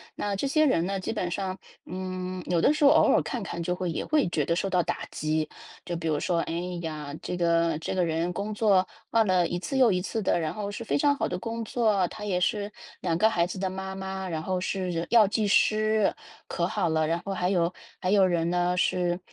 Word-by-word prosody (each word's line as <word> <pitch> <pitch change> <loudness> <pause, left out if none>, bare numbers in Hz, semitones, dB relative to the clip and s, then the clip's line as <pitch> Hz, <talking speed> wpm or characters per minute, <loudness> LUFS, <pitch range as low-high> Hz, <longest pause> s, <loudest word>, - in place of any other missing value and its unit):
那 205 -1 -2
这 275 - -1
些 310 +2 +3
人 175 - +2
呢？ 195 0 -2
基 185 - -3
本 180 -5 -2
上， 190 0 -3 0.3
嗯， 185 0 -5
有 170 -1 +2
的 295 - +4
时 300 - -1
候 280 - +8
偶 - - +6
尔 - - +4
看 240 -4 -4
看 170 -2 -5
就 180 +1 -1
会 180 -2 -2
也 - - -3
会 300 -7 +2
觉 150 -4 0
得 170 - +1
受 195 +2 -1
到 180 -1 +3
打 - - -3
击。 155 0 -1 0.4
就 175 - -3
比 165 -1 -4
如 150 -2 +1
说， 170 -2 0
哎 165 - -2 0.3
呀， 150 -3 -5
这 180 - -4
个 170 -2 +2
这 - - -3
个 180 -2 +2
人 165 +2 -1
工 205 +3 -3
作 200 -4 +3 0.2
换 225 -1 +4
了 180 -2 +3
一 175 - -3
次 270 +8 -3
又 245 -5 +5
一 180 -1 +1
次 220 +3 -3
的， 175 - +1
然 155 -1 -2
后 205 -1 -4
是 230 +3 -6
非 - - 0
常 285 0 +3
好 - - -1
的 - - -3
工 230 +2 -4
作， 210 -6 +2
她 210 - -8
也 180 -3 0
是 205 +2 0 0.3
2 165 -2 0
个 220 +3 +4
孩 170 -5 +2
子 185 - -6
的 190 -1 -1
妈 190 0 -5
妈， 190 0 -5
然 160 -2 -3
后 185 -1 -1
是 180 -3 -2
药 225 -3 +6
剂 210 0 0
师， 215 0 +3 0.3
可 170 0 -1
好 185 -5 0
了。 160 -1 +1
然 165 +1 0
后 195 - -2
还 180 0 0
有 175 -2 +1 0.3
还 185 0 -1
有 195 -2 +5
人 170 -2 +1
呢， 180 0 +1
是 180 -1 +1
185 Hz, 260 characters per minute, -27 LUFS, 170-205 Hz, 0.4 s, 候